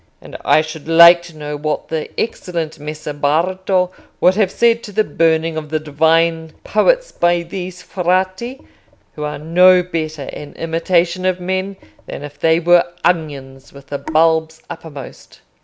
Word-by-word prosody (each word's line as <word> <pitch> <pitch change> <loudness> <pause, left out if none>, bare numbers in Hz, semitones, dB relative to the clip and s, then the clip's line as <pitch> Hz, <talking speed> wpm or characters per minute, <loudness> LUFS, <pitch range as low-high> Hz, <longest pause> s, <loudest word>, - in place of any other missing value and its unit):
And - - -13
I 155 - +4
should 155 -1 -9
like 170 +1 +8
to 165 -2 -13
know 150 0 -5
what 150 +1 -3
the 160 -1 -3
excellent 170 -8 -3
Messer 150 0 -6
Bardo 180 +5 0 0.3
would 180 - +4
have 200 -1 +1
said 230 +3 +2
to 210 - -9
the 215 +2 +1
burning 160 -1 0
of 155 -1 -6
the 155 +1 -1
divine 160 +2 +1
poets - - +1
by 175 0 +1
these 180 +1 -7
Frati, 185 +8 -1 0.5
who 150 - -7
are 150 - -4
no 180 +4 +4
better 155 -4 -4
an 145 -1 -9
imitation 170 +2 0
of 185 -1 0
men 190 +2 -3 0.3
than - - -7
if 145 0 -10
they 165 0 +3
were 175 0 +4 0.2
onions 140 -6 -2
with 140 -1 -15
the 140 - -4
bulbs 160 0 +1
uppermost. 155 -5 -11
165 Hz, 155 wpm, -17 LUFS, 155-180 Hz, 0.5 s, like